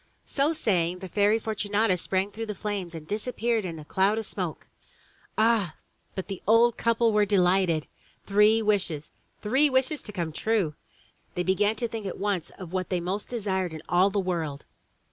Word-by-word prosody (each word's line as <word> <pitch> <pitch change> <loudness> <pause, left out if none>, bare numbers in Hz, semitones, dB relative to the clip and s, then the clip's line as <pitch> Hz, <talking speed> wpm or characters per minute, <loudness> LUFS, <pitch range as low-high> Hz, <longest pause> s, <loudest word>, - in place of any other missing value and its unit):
'' - - -40
So 285 +3 +4
saying, 180 - +1
the 190 +1 -7
Fairy 205 +4 +3
Fortunata 210 -2 0
sprang 190 +3 -1
through 225 +1 -5
the 210 - -4
flames 195 -4 -4
and 155 -1 -8
disappeared 225 +1 -1
in 165 -3 -5
a 155 - -9
cloud 195 +6 +2
of 225 - -2
smoke. - - -5 0.7
Ah! 220 -7 +3 0.4
but 190 - -4
the 195 -3 -6
old 230 +2 +5
couple 230 -1 +2
were 210 0 +4
delighted. 180 -5 +2 0.4
Three 210 +2 +4
wishes! 190 -8 0 0.3
Three 265 +8 +4
wishes 265 +3 +1
to 210 - -9
come 170 -5 -3
true! 195 -2 0 0.6
They 180 - 0
began 205 +4 +2
to 235 +2 -2
think 220 -3 -5
at 185 - -5
once 200 -5 -1
of 180 -2 -9
what 185 -1 -2
they 180 - 0
most 185 +4 -3
desired 190 -7 -2
in 155 - -8
all 180 +3 +4
the 200 +1 0
world. 165 -6 -2
200 Hz, 185 wpm, -27 LUFS, 180-220 Hz, 0.7 s, old